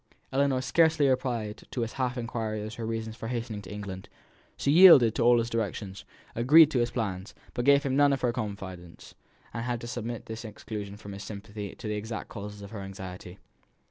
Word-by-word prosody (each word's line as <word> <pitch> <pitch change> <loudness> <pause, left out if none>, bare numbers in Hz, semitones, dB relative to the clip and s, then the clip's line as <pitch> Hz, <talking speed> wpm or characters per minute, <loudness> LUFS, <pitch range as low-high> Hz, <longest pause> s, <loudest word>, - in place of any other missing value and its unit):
Ellinor 135 -1 +2
scarcely 155 0 +3
replied 120 -5 -1
to 125 - -3
his 115 0 -3
half 130 -1 -2
inquiry 110 -3 -3
as 110 +1 -6
to - - -11
her - - -3
reasons 110 -1 -4
for 115 - -7
hastening 115 -3 -4
to 95 - -11
England. 100 -2 -7 0.5
She 140 - +1
yielded 150 - +9
to - - -2
all 120 +1 +6
his 115 0 0
directions, 100 -3 -3 0.3
agreed 150 +7 +7
to 130 - +1
his 120 0 +1
plans, 100 -4 -4 0.2
but 120 - -2
gave 140 0 +5
him 135 -2 0
none 145 0 +5
of 135 - 0
her 120 -2 +1
confidence, 95 -6 -7 0.4
and 115 - -3
he - - -4
had 120 -1 -1
to 120 - -6
submit 120 -1 -5
to 110 - -6
this 110 - -7
exclusion 105 -2 -7
from 100 -2 -9
sympathy 105 0 -7
in - - -12
the 105 -1 -4
exact 110 +2 -5
causes 105 0 -8
of 100 - -10
her 105 -3 -6
anxiety. 95 -1 -8
115 Hz, 210 wpm, -28 LUFS, 105-125 Hz, 0.5 s, yielded